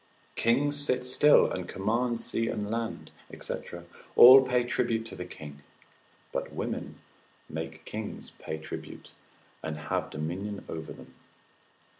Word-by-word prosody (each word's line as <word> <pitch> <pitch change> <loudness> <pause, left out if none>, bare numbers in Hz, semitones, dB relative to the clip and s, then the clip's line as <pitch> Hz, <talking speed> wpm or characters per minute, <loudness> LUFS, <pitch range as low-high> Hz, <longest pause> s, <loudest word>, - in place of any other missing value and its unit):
Kings 145 +5 +2
sit 125 -2 0
still 145 +4 +5
and 90 -1 -4
command 115 +4 0
sea 115 0 -1
and 105 -1 -3
land, 115 0 -4 0.3
&c., - - -3 0.6
all 130 +2 +11
pay 125 -1 +2
tribute 115 -2 0
to 100 - -8
the 90 -1 -6
king; 75 -5 -10 0.7
but - - -3
women - - -4 0.5
make 80 0 -6
kings 110 0 -6
pay 80 - -5
tribute, 80 - -9 0.5
and 80 -1 -4
have 75 0 -2
dominion 95 +7 -4
over 80 -1 -6
them. - - -12
110 Hz, 130 wpm, -29 LUFS, 80-125 Hz, 0.7 s, all